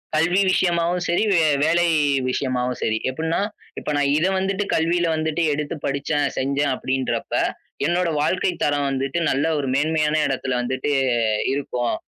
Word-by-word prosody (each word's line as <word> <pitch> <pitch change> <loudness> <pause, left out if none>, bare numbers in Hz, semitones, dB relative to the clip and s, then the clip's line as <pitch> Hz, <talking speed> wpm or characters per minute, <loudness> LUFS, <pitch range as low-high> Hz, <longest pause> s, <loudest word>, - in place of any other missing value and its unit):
கல்வி 170 +4 +2
விஷயமாவும் 175 -1 +1
சரி, 175 +4 +2
வே 170 - +4 0.2
வேலை 170 +2 +3 0.4
விஷயமாவும் 125 -1 -1
சரி, 110 0 +1
எப்படின்னா, 160 +5 -2 0.4
இப்ப - - -6
நான் 145 -1 +2
இதை 170 +5 +2
வந்துட்டு 195 +1 -1
கல்வியில 170 +2 +1
வந்துட்டு 160 +1 -1
எடுத்து 150 +2 -3
படிச்சேன், 140 +1 -1
செஞ்சேன் 140 +1 0
அப்படின்றப்ப, 130 0 -2 0.5
என்னோட 175 +3 +1
வாழ்க்கைத்தரம் 150 -4 0
வந்துட்டு 135 +4 -1
நல்ல 140 +3 +1
ஒரு 140 -2 -2
மேன்மையான 155 +1 +1
இடத்துல 135 -1 -2
வந்துட்டு 130 +3 -2 0.6
இருக்கும். 125 -4 -2
150 Hz, 135 wpm, -22 LUFS, 135-170 Hz, 0.6 s, வே